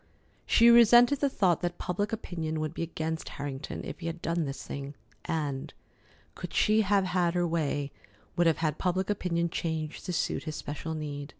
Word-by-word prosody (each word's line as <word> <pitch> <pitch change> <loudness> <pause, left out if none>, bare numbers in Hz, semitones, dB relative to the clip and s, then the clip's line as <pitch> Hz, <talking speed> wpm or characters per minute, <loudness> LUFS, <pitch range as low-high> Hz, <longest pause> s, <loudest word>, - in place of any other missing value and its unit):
She 235 0 +6
resented 240 +3 +7
the 280 - +2
thought 185 - +2
that 175 0 -2
public 205 +3 -2
opinion 165 -8 -3
would 155 0 -3
be - - -5
against 160 -1 -3
Harrington 140 0 -5
if - - -7
he 170 - -5
had 165 +1 -4
done 165 -1 -1
this 135 -1 -5
thing, 140 +1 -6 0.3
and, 145 -4 -2 0.6
could - - -8
she 215 +1 +4
have 200 -1 +3
had 180 -1 +1
her 175 0 +2
way, 145 -4 -1 0.4
would 175 -1 +3
have 165 - +3
had 155 -2 -1
public 185 +2 0
opinion 170 -4 -1
changed 160 -3 -3
to 180 - -2
suit - - -1
his 155 - -4
special 160 +2 -5
need. 145 -2 -5
165 Hz, 185 wpm, -29 LUFS, 155-185 Hz, 0.6 s, resented